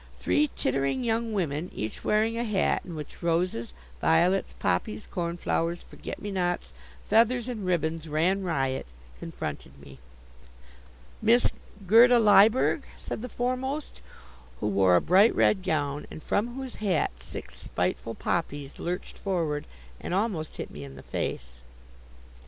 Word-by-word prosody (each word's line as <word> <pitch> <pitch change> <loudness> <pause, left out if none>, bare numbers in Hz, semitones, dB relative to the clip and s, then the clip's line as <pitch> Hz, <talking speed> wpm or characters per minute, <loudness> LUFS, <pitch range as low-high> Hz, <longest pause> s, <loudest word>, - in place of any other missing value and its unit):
Three 300 0 +2
tittering 135 - 0
young 230 0 0
women, 170 -4 -1
each 110 0 -4
wearing 220 +2 +2
a 235 - -1
hat 210 -5 +1
in 175 - -8
which 150 -2 -8
roses, 170 -8 0 0.3
violets, 175 +4 +3
poppies, 215 -1 -1
cornflowers, 170 -1 -2
forget - - -8
me 205 - -5
nots, 175 -2 -1 0.3
feathers 230 +3 +3
and 220 -7 -4
ribbons 165 -2 -1
ran 175 +6 +2
riot, 135 -7 -1 0.3
confronted - - -6
me. 70 -2 -13 1.2
"Miss 235 +2 +4 0.3
Gerda 235 +5 +7
Lyberg?" 215 +2 +5 0.2
said - - -6
the 250 - -5
foremost, 255 +5 -3 0.6
who - - -3
wore 95 -2 +4
a 90 - +5
bright 195 +6 +5
red 195 - +3
gown, 145 -4 -1
and 155 - -9
from 235 +4 0
whose 265 -2 -6
hat 190 -8 +1
six 65 - -9
spiteful 115 - -2
poppies 145 -4 -3
lurched 180 +1 -4
forward 165 -7 -1 0.3
and 180 - -3
almost 190 -7 -1
hit - - -5
me 75 - -8
in 70 -1 -10
the - - -11
face. 60 +1 -4
180 Hz, 140 wpm, -27 LUFS, 150-220 Hz, 1.2 s, Gerda